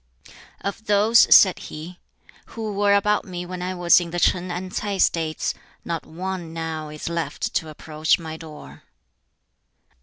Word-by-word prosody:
"Of 210 +3 -5
those," 210 +3 +5
said 190 -3 +7
he, 165 +4 -9 0.5
"who 220 -2 -5
were 200 0 +3
about 210 +1 +2
me 180 -2 -6
when 180 0 -6
I 185 +1 -3
was 175 0 +5
in 170 - -5
the 175 +1 -3
Ch'in 180 +1 +1
and 180 +1 -5
Ts'ai 205 -3 -2
States, 160 -3 +1 0.3
not 165 -2 -4
one 175 0 -5
now 160 -2 -4
is 150 0 -7
left 170 -1 -3
to 160 - -1
approach 155 0 0
my 160 -2 -7
door." 150 - -11
175 Hz, 155 wpm, -23 LUFS, 160-195 Hz, 0.5 s, said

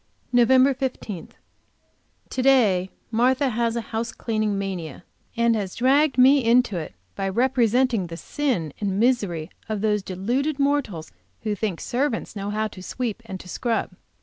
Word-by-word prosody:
Nov. 240 -1 +5
15. 260 - +1 1.0
To 255 - -1
day 215 -9 +4 0.2
Martha 260 +4 +2
has 230 0 0
a 235 - -1
house 230 +1 -1
cleaning 215 -3 -1
mania, 180 -6 -5 0.3
and 235 0 +3
has 195 -4 -3
dragged 270 +3 +3
me 265 +2 +6
into 235 -2 +3
it 155 - -6 0.2
by 195 0 -2
representing 245 -2 +2
the 165 0 -7
sin 225 - -2
and 195 -1 -1
misery 200 -9 +1 0.2
of 215 -2 -2
those 210 -1 +1
deluded 240 +11 -1
mortals 280 - -1 0.3
who 215 - 0
think 205 -4 -2
servants 245 -3 -2
know 200 0 -4
how 215 +1 -1
to 185 - -11
sweep 235 +3 -4
and 190 - -6
to - - -14
scrub. 230 +5 -1
225 Hz, 150 wpm, -24 LUFS, 195-255 Hz, 1.0 s, me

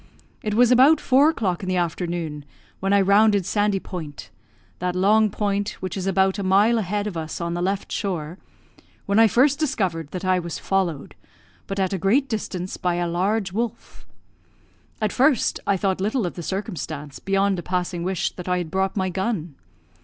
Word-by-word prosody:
It 210 -1 -2
was 245 +1 +5
about 270 +5 +6
four 275 +3 +4
o'clock 195 - -1
in 185 - -4
the 185 - 0
afternoon 170 -3 -2 0.4
when 195 +1 -1
I 200 0 +5
rounded 200 0 +4
Sandy 205 0 +1
Point, 160 -6 -8 0.5
that 180 0 -2
long 210 +4 +4
point 205 0 -1
which 185 - -4
is 190 -1 -3
about 190 +1 +2
a - - -2
mile 205 +5 +4
a - - 0
head 205 +1 -2
of 210 -4 -4
us 160 -1 -5
on 170 0 -2
the 175 - -2
left 195 +2 -2
shore, 175 -4 -3 0.7
when 200 +2 +2
I 225 - +7
first 270 +7 +3
discovered 185 - -1
that 185 +2 -5
I 185 0 +3
was 170 -2 -5
followed, 180 -7 -1 0.5
but 195 0 -4
at 190 0 0
a 190 - -2
great 240 - +2
distance, 185 -5 -4
by 180 -1 0
a 175 0 -1
large 190 +3 0
wolf. 230 +1 -5 0.9
At 215 - 0
first, 265 0 +2
I 200 -1 +3
thought 190 0 -1
little 215 +2 0
of 175 - -3
the 175 - -7
circumstance, 160 - -5
beyond 195 -1 +1
a - - -3
passing 180 0 -2
wish 185 0 -1
that 180 0 -8
I 180 - +2
had 175 -3 -4
brought 190 +2 -1
my 190 -1 0
gun. 185 -3 -2
190 Hz, 190 wpm, -23 LUFS, 175-210 Hz, 0.9 s, I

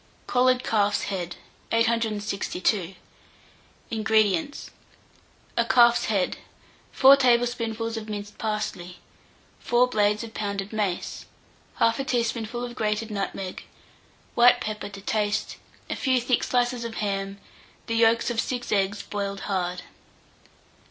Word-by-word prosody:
COLLARED 255 0 +3
CALF'S 205 -2 +1
HEAD. 180 -3 -4 0.4
862. 215 -4 0 1.0
INGREDIENTS. 220 +6 +1 0.8
A 235 - +3
calf's 235 +1 +5
head, 200 -4 0 0.5
4 270 +1 +8
tablespoonfuls 235 -3 +1
of 220 -1 -6
minced 205 0 -6
parsley, 210 -5 -3 0.6
4 245 +1 +3
blades 210 -2 +1
of 225 -1 -9
pounded 200 0 -3
mace, 200 -5 -2 0.5
1/2 250 +4 +2
teaspoonful 235 -1 -1
of 240 - -7
grated 215 -1 -1
nutmeg, 195 -2 -4 0.7
white 245 +1 +6
pepper 215 -3 -4
to 200 -1 -10
taste, 210 0 -1 0.3
a - - -3
few 260 -2 +2
thick 245 0 +1
slices 245 -1 0
of 230 -1 -5
ham, 195 -1 -3 0.5
the 230 - -3
yolks 230 +1 +3
of 230 - +1
6 245 -1 -4
eggs 200 0 +1
boiled 200 -1 -4
hard. 180 -2 -2
220 Hz, 115 wpm, -25 LUFS, 200-235 Hz, 1.0 s, 4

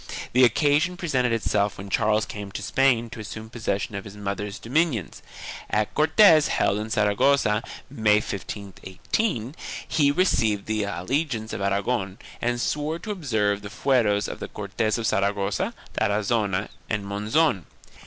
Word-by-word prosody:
The 130 +2 +5
occasion 145 +8 +3
presented 130 -9 0
itself 105 -3 0
when 95 +1 -8
Charles 105 +2 +2
came 100 -4 -7
to - - -5
Spain 120 -4 +2
to - - -8
assume 110 +1 -8
possession 105 -3 -2
of 100 0 -4
his 100 0 -11
mother's 100 +1 -4
dominions. 130 - -1 0.5
At 105 0 0
Cortes 160 +1 +6
held 100 - +1
in 110 +1 -4
Sara 105 -1 +1
gossa, 115 -4 +3 0.2
May, 110 -6 +2
1518, 105 - -3 0.3
he 145 -3 +3
received 115 - +1
the 110 -1 -1
allegiance 110 - -2
of - - -4
Aragon 100 0 -1 0.2
and 120 0 0
swore 150 +5 -1
to 215 +5 -6
observe 110 - 0
the 100 - -8
fueros 105 -2 +1
of - - -6
the - - -5
Cortes 105 +2 -2
of 115 - -3
Saragossa, 100 -1 0 0.2
Tarazona 105 -1 0 0.2
and 105 -2 -2
Monzon. 105 - +1
110 Hz, 145 wpm, -25 LUFS, 100-135 Hz, 0.5 s, Cortes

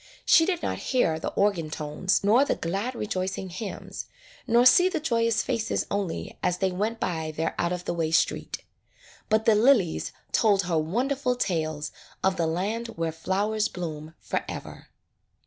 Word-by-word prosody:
She 325 - +6
did 355 -3 -1
not - - -2
hear 165 - +2
the - - -2
organ 195 -6 +1
tones 155 +7 -1
nor 225 +7 +5
the 285 - 0
glad 200 +9 -3
rejoicing 190 -3 -3
hymns, 190 +3 -6 0.4
nor 240 +1 +4
see 355 +9 +7
the 335 - -2
joyous 230 -6 +1
faces 230 -3 -1
only 200 -4 -3
as 180 - +1
they 190 0 +1
went 215 +5 -2
by 160 -5 -2
their 160 +1 0
out 170 - +1
of 180 0 -4
the - - -1
way 165 -2 -1
street. 160 - 0 0.7
But 220 0 +2
the 225 - +6
lilies 215 -6 +3 0.2
told 205 -4 +3
her 170 -3 +1
wonderful 250 - 0
tales 155 -8 -2 0.3
of 190 0 +3
the 165 - 0
land 205 +8 -2
where 165 -1 -1
flowers 205 +6 0
bloom 160 -2 -6
forever. - - -5
195 Hz, 165 wpm, -26 LUFS, 165-230 Hz, 0.7 s, see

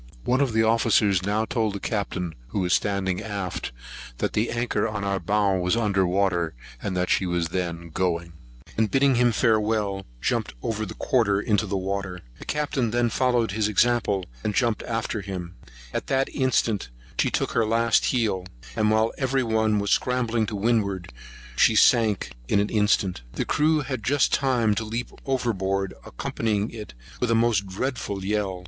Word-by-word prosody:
One 130 +3 +2
of 135 -5 +1
the 110 0 +3
officers 110 -4 +3
now 105 +3 0
told 110 -3 -1
the - - -4
Captain, 95 -5 -2
who 95 - -2
was 90 -1 +1
standing 95 -2 0
aft, 100 -9 -4 0.5
that - - -1
the 110 +3 +1
anchor 120 -1 0
on 110 -2 -4
our 100 -1 0
bow 100 -2 +1
was 90 +4 +1
under 100 -5 +2
water; 90 -4 +1 0.3
that 90 -2 -1
she 95 - +2
was 85 -2 0
then 85 -1 -3
going; 85 -1 -1 0.4
and, 110 -1 +1
bidding 135 +5 +3
him 120 0 +4
farewell, 105 -3 +1
jumped - - -1
over 110 -1 -2
the - - -8
quarter 105 -6 +2
into 105 0 +1
the 100 0 -1
water. 95 -1 -3 0.2
The - - -10
Captain 145 -5 -1
then 120 +1 +1
followed 120 -4 +1
his 105 +1 +1
example, 105 -3 +2 0.2
and 105 - -1
jumped 115 -3 +1
after 115 -1 -2
him. 95 -3 -6 0.4
At - - -3
that 135 0 +1
instant 115 - 0 0.3
she - - +3
took - - -1
her 115 - +2
last 115 +1 +2
heel; 105 -7 0 0.3
and, 110 -2 +2
while 110 +1 +2
every 130 -1 +1
one 110 -2 +2
were 100 - -1
scrambling 120 0 +1
to 105 - -4
windward, 100 - 0 0.4
she 110 - +4
sunk 110 -3 +4 0.2
in 100 - +3
an 105 - +1
instant. 105 - +1
The - - -2
crew 155 +1 +2
had 130 -4 -4
just 140 +4 +2
time 125 -6 +2
to 110 - -2
leap 115 +3 -4 0.2
over 130 -3 +1
board, 95 0 -1
accompanying 105 - -2
it 105 - -9 0.2
with 125 - 0
a 115 - +3
most 115 -4 +2
dreadful 100 -2 -3
yell. 100 -2 -1
105 Hz, 175 wpm, -25 LUFS, 95-115 Hz, 0.5 s, him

